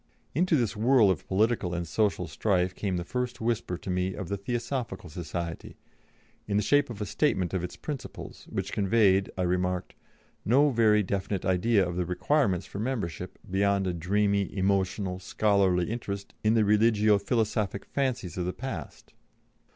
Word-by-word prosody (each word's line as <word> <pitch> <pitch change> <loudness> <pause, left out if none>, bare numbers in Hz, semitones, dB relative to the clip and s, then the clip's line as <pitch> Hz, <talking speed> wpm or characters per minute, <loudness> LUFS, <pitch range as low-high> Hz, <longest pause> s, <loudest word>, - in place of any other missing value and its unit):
Into 175 +3 +2
this 120 -7 0
whirl 110 -2 +5
of 90 - -4
political 95 -3 +1
and 85 0 -3
social 105 +6 +1
strife 95 -3 0
came 95 -1 -2
the 85 - -2
first 125 +5 -3
whisper 115 -6 -1
to 95 - -8
me 90 +1 -1
of 95 -4 -6
the 100 - -1
Theosophical 120 - -4
Society, 85 0 -5 0.7
in 100 -1 +1
the 105 - +2
shape 145 +6 +3
of 110 -3 -7
a - - -1
statement 95 - 0
of 90 -2 -1
its 90 - -5
principles, 145 -4 -7
which 95 +1 -3
conveyed, 100 -2 +3
I 90 - 0
remarked, 90 0 -1 0.5
"no 140 +6 +4
very 110 -3 +4
definite 100 0 -2
idea 95 +2 +3
of 90 0 -4
the 90 - 0
requirements 95 - +1
for 100 - -7
membership, 100 -7 -3
beyond 100 +1 +1
a 90 - -1
dreamy, 100 +3 +1
emotional, 95 -1 0
scholarly 95 -2 +2
interest 100 -4 -5
in 110 +1 +3
the 110 -2 +4
religio 105 0 +4
philosophic 105 -2 -1
fancies 125 - -2
of 90 - -1
the 90 - -2
past." 110 - -7
100 Hz, 165 wpm, -28 LUFS, 90-115 Hz, 0.7 s, whirl